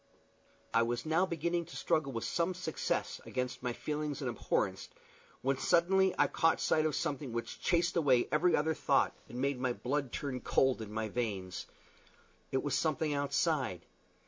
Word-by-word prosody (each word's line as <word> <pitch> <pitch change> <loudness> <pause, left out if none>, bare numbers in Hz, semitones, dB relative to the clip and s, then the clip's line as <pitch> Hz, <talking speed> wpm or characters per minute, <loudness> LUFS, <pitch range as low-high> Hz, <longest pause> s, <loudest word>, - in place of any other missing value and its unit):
I 115 - +5
was 120 +2 -1
now 165 +4 +2
beginning 170 +1 -1
to 170 - -11
struggle 145 -3 +1
with 115 -3 -3
some 175 +2 0
success 175 -3 -2
against 125 -1 -3
my 125 -1 -1
feelings 150 +3 -3
of - - -1
abhorrence, - - -1 0.5
when 135 0 +1
suddenly 190 +2 +3
I - - +5
caught 165 -1 +2
sight 155 0 +2
of 150 - -2
something 140 -6 -2
which 115 0 -4
chased 175 -1 +2
away 135 -7 +4
every 180 -2 +4
other 160 +2 +1
thought, - - +2
and 120 - -7
made 135 0 0
my 125 -1 0
blood 135 +1 -2
turn 135 -3 -3
cold 130 -3 +2
in 105 -1 -7
my 110 0 -2
veins. 100 -5 -3 0.8
It 130 - 0
was 145 -3 0
something 155 +1 +1
outside. 140 - 0
140 Hz, 170 wpm, -33 LUFS, 125-165 Hz, 0.8 s, I